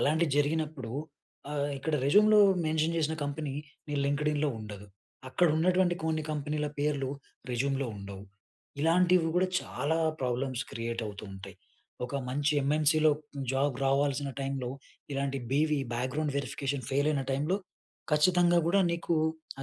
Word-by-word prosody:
అలాంటివి 160 +2 +2
జరిగినప్పుడు, 145 -4 0 0.6
ఆహ్, 145 0 -1
ఇక్కడ 155 +3 -1
రెజ్యూమ్‌లో 210 +7 +6 0.3
మెన్షన్ 160 +1 +1
చేసిన 160 0 0
కంపెనీ 145 -1 -3 0.3
నీ 145 - -2
లింక్డ్ఇన్‌లో 150 +1 +1
ఉండదు. 105 -1 -8 0.4
అక్కడ 175 +5 +3
ఉన్నటువంటి 180 +2 +3
కొన్ని 160 -1 0
కంపెనీల 150 0 -2
పేర్లు 145 -2 0 0.4
రెజ్యూమ్‌లో 135 +2 0
ఉండవు. 100 0 -8 0.6
ఇలాంటివి 175 0 +4
కూడా, 185 +1 +3
చాలా 145 +6 -1 0.2
ప్రాబ్లమ్స్ 130 +1 -1
క్రియేట్ 115 0 -3
అవుతూ 105 0 -7
ఉంటాయి. 95 - -10 0.5
ఒక 125 - -6
మంచి 145 +3 +1
ఎమ్‌ఎన్‌‌సి‌లో 155 +2 +4 0.4
జాబ్ 135 0 +1
రావాల్సిన 140 +1 +1
టైమ్‌లో 135 -2 -2 0.5
ఇలాంటి 135 0 -1
బివి, 150 +1 +2 0.2
బ్యాక్గ్రౌండ్ 130 +5 -1
వెరిఫికేషన్ 140 -2 -3
ఫెయిల్ 140 +3 +2
అయిన 140 -3 0
టైమ్‌‌లో 150 +8 +1 0.5
ఖచ్చితంగా! 175 +3 +4
కూడా 195 +4 +4
నీకూ 170 0 -1 0.5
ఆ - - -4
145 Hz, 130 wpm, -30 LUFS, 135-160 Hz, 0.6 s, రెజ్యూమ్‌లో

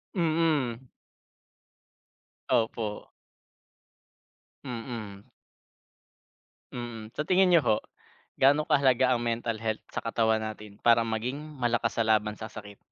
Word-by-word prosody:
Mm. 155 - +1 1.6
Opo. 115 -3 -1 1.5
Mm. 115 -5 -7 1.5
Mm, 115 -2 -7
sa 150 - -1
tingin 185 +3 +4
niyo 175 -2 +5
ho, 110 - +3 0.7
gaano 145 +3 +5
kahalaga 130 -3 +3
ang 120 - +1
mental 115 -1 -2
health 110 -1 -3
sa - - -2
katawan 110 -1 +1
natin 105 -1 -7
para 115 -1 +5
maging 115 +4 -2
malakas 120 -7 -1
sa 115 - +2
laban 105 -1 +2
sa 110 - -5
sakit? 105 -2 -11
115 Hz, 105 wpm, -28 LUFS, 110-135 Hz, 1.6 s, niyo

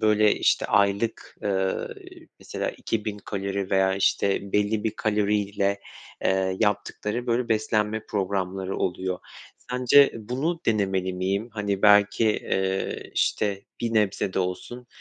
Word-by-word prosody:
böyle, 105 -1 +4
işte, - - +2
aylık, 100 +3 +1
eee, 95 -2 0 0.6
mesela - - -4
2.000 105 -2 -3
kalori 100 -1 -4
veya, 95 0 +3
işte, 100 0 +1
belli 105 +1 +1
bir 110 - +2
kaloriyle, 100 -1 0 0.4
eee, 95 0 +1
yaptıkları, 105 +3 -1
böyle, 120 0 0
beslenme 110 0 0
programları 95 -1 -2
oluyor. 90 0 -2 0.5
Sence 125 +3 +5
bunu 130 +10 -2
denemeli 95 -4 +1
miyim? 95 +5 -1
Hani, 100 -2 -2
belki, 105 +2 +5
eee, 95 -2 -1
işte, 100 -2 0 0.2
bir 115 -1 -1
nebze 100 -2 +1
de - - -1
olsun, 95 +7 -4
105 Hz, 120 wpm, -25 LUFS, 95-110 Hz, 0.6 s, Sence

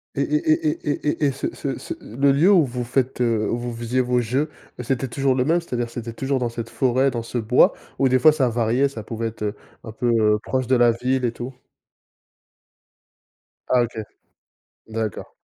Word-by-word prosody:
Et - - 0
et 315 +1 +1
et 310 - -2
et - - +4
et 150 - -1
et - - +5
et - - +1
ce 135 - -3
ce - - -3
ce - - -6
le 135 +5 +1
lieu 165 +8 +4
où 175 -7 +5
vous 125 -1 -4
faites, 125 +1 -1
heu, 115 -3 +1
où 115 - 0
vous 120 0 -4
faisiez 120 +2 -1
vos 125 0 +1
jeux, 130 +6 -1 0.3
bah, 125 - -5
c'était 135 +2 -1
toujours 135 +1 0
le 125 -1 +1
même, 170 +4 +2
c'est-à-dire, 120 -7 -3
c'était 115 -1 -6
toujours 135 +4 -1
dans 120 -1 -1
cette 115 0 -6
forêt, 130 +3 +2
dans 120 -1 -3
ce 120 - -5
bois? 115 +2 +4 0.2
Où, 135 - +3
des 130 0 +3
fois, 155 +5 +6
ça 135 -5 +1
variait, 120 +4 +1
ça 115 -5 -8
pouvait 115 +1 -3
être, 110 -1 -7
heu, 105 0 -2 0.3
un 110 - -8
peu, 120 +2 -1
heu, 110 -2 +3
proche 130 -2 -1
de 130 - +3
la 120 -1 +5
ville 125 +3 -1
et 120 - +1
tout? 120 +3 -7 2.2
Ah, 125 - +4
OK. 120 -1 -6 0.9
D'accord. 110 -3 -4
125 Hz, 215 wpm, -22 LUFS, 115-135 Hz, 2.2 s, fois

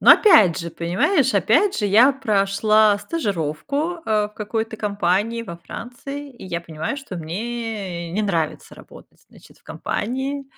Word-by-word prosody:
Но - - +9
опять 215 - +6
же, 170 - -6
понимаешь, 220 - +1
опять 230 - +3
же 205 - 0
я 235 +8 +6
прошла 215 -2 +3
стажировку, 280 - -2
э, 210 -1 +1
в 210 - -25
какой-то 220 +1 -3
компании 205 +2 0
во 170 -6 -8
Франции, 275 +8 -8
и 245 - -13
я 170 -1 -3
понимаю, 160 - -5
что 270 -10 -7
мне 190 -1 -5
не 215 +3 0
нравится 165 -6 -2
работать, - - -16
значит, - - -19
в - - -34
компании. 265 +5 -3
215 Hz, 145 wpm, -21 LUFS, 180-255 Hz, -, Но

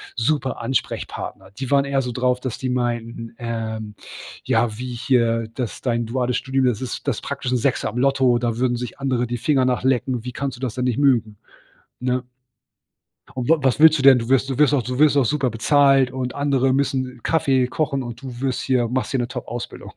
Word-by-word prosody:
super 130 +2 -1
Ansprechpartner. 115 -5 -4
Die 135 +1 -5
waren 140 -1 +4
eher 135 -1 0
so 125 - -3
drauf, 125 +1 0
dass 125 -2 -5
die 130 - -2
meinten, 120 -2 -3
ähm: 110 -2 -4 0.5
„Ja 110 -3 +1
wie 125 +1 -5
hier 115 -2 +1
das 125 -5 -4
dein 120 -2 0
duales 125 +1 -1
Studium, 135 0 0
das 120 -4 +1
ist 130 +2 -6
das 130 -6 -1
praktisch 135 -2 -4
'n 130 - +2
Sechser 130 +2 0
im 120 - -7
Lotto, 130 -2 +3
da 120 -1 -1
würden 125 -1 +1
sich 125 +2 -6
andere 130 -3 0
die 120 0 -3
Finger 135 0 +2
nach 125 -1 +1
lecken. 125 -2 0
Wie 125 - -5
kannst 135 0 -4
du 125 - -15
das 125 -4 -3
denn 125 - -2
nicht 125 0 0
mögen,“ 115 -7 +2 0.6
ne? 125 0 -1 1.1
Und: 125 -2 -3
„W - - +8
was 130 +1 +1
willst 160 -1 +7
du - - -2
denn? 135 -2 +8
Du 115 - -5
wirst 135 +1 +2
du 130 - -2
wirst 150 -1 +4
auch 130 - +2
du 125 +3 -4
wirst 150 -1 +5
auch 135 - +4
super 135 0 +1
bezahlt 135 +2 +3
und 130 -1 -4
andere 135 -2 +1
müssen 130 -2 -1
Kaffee 135 -6 +2
kochen 140 -2 -1
und 120 +1 -8
du 130 -2 -8
wirst 130 -2 -1
hier 125 -3 +1
machst 130 +2 -2
hier 135 - 0
'ne 120 - -1
Topausbildung.“ 120 0 -7
125 Hz, 215 wpm, -22 LUFS, 120-135 Hz, 1.1 s, W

